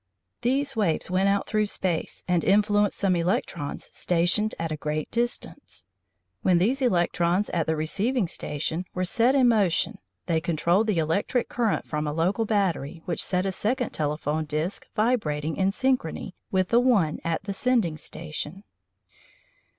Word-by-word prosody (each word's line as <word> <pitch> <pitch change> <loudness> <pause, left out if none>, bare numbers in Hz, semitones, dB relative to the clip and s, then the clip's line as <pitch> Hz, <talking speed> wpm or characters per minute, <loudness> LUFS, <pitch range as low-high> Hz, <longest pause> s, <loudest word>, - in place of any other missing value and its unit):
These 270 +2 0
waves 185 -5 0
went 190 +2 +3
out 200 0 +1
through 215 -1 +1
space 180 -5 -2
and 180 -2 +2
influenced 205 0 +3
some 195 -2 +2
electrons 170 - -2
stationed 175 +5 +1
at 165 -1 -3
a - - -1
great 150 0 -3
distance. 240 - -3 0.6
When 180 -2 +4
these 240 +10 +1
electrons 175 -3 +1
at 165 -2 0
the 160 - +1
receiving 200 +8 0
station 160 +3 -3
were 185 0 0
set 235 +8 +3
in 260 -3 +5
motion 205 -7 +2 0.3
they 160 -1 +1
controlled 170 +6 +1
the 210 -5 +1
electric 165 +10 0
current 230 -4 0
from 150 -1 -2
a 150 - -2
local 180 +8 +1
battery 175 -7 -1
which 175 -3 -2
set 180 0 0
a 195 - 0
second 235 +6 -1
telephone 150 +1 -1
disc 155 +6 -3
vibrating 160 -10 0
in 190 0 +2
synchrony 250 -6 0 0.2
with 185 -1 +1
the 235 - +5
one 215 -12 +2
at 165 +2 -1
the 200 0 -3
sending 215 -6 +1
station. 155 +4 -6
185 Hz, 155 wpm, -26 LUFS, 160-215 Hz, 0.6 s, in